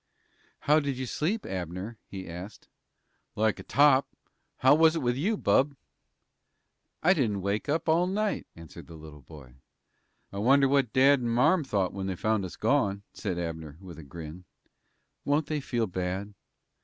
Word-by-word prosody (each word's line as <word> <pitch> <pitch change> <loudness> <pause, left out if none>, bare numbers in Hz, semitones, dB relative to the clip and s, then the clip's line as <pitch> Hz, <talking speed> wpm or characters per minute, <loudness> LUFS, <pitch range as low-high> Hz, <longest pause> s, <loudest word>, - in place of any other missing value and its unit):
"How 150 +2 +4
did 140 -3 -3
you 130 - -3
sleep, 170 - -2
Abner?" 95 +4 -5
he 95 -1 -8
asked. 90 +5 -9 0.7
"Like 110 0 +1
a - - -8
top. 140 -1 +4 0.5
How 130 +2 +5
was 160 +1 +5
it 165 - -1
with 120 0 +1
you, 200 - 0
bub?" 140 -5 +2 1.3
"I 180 +4 +6
didn't 105 - -1
wake 100 +7 -2
up 160 +3 0
all 165 +3 +3
night," 210 +2 -1
answered 85 -1 -12
the 85 - -11
little 75 -2 -12
boy. 65 -3 -14 0.8
"I 100 - -4
wonder 135 +5 +4
what 135 -4 +2
dad 135 +1 +5
and 120 -1 -2
marm 125 +9 +3
thought 100 -8 -1
when 95 -1 -4
they 95 - -2
found 110 +1 0
us 90 - -8
gone?" 105 -5 +1
said 95 -5 -4
Abner, 80 -3 -5
with 90 -3 -11
a - - -9
grin. 80 +5 -9 0.8
"Won't 145 +2 +1
they 155 -1 -2
feel 120 -4 -1
bad?" 95 +2 -4
110 Hz, 165 wpm, -28 LUFS, 90-140 Hz, 1.3 s, I